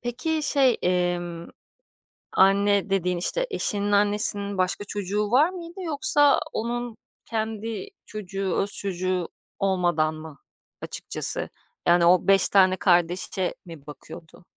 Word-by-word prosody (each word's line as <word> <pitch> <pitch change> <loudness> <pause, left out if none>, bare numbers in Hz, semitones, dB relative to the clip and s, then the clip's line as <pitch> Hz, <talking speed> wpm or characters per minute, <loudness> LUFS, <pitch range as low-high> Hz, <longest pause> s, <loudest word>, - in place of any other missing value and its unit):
Peki 250 +7 -3
şey, 270 -5 +2
emm, 175 -1 -2 0.8
anne 200 +1 +2
dediğin, 180 -2 -1
işte, - - -1
eşinin 205 - -2
annesinin 205 -1 +3
başka 185 +2 -1
çocuğu 205 +1 -3
var 290 +8 +3
mıydı 350 0 -10
yoksa 290 -3 +2
onun 235 0 -4 0.3
kendi 225 - -5 0.2
çocuğu, 195 -2 -5
öz 200 - +7
çocuğu 185 -2 0 0.3
olmadan 175 -5 0
mı 155 -2 -11 0.4
açıkçası? - - 0 0.4
Yani, 175 0 +4
o 180 0 +3
5 195 -1 +4
tane 185 -1 +3
kardeşe 180 +1 0
mi 165 -5 -13
bakıyordu? 160 +3 -13
195 Hz, 115 wpm, -24 LUFS, 180-225 Hz, 0.8 s, öz